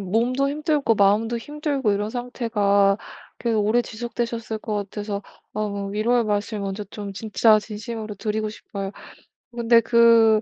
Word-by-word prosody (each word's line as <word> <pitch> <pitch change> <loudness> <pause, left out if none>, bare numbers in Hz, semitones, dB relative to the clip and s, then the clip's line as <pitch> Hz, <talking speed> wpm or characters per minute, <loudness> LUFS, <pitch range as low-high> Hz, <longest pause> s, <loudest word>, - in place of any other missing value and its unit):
몸도 235 +8 +1
힘들고 295 -4 +1
마음도 210 +4 +3
힘들고 285 -4 -1
이런 205 +2 -1
상태가 210 -5 +1 0.4
계속 230 -3 +1
오래 235 +3 +3
지속되셨을 235 -1 -4
것 215 0 -4
같아서 205 0 -4 0.3
어 200 -1 -3
위로의 230 +4 +1
말씀 210 0 -1
먼저 195 +1 -3
좀 205 -2 -6
진짜 215 +1 +3
진심으로 215 +1 -6
드리고 215 +1 -2
싶어요. 200 -2 -6 0.6
근데 235 -1 +4
그 230 -2 +5
220 Hz, 305 characters per minute, -23 LUFS, 205-235 Hz, 0.6 s, 그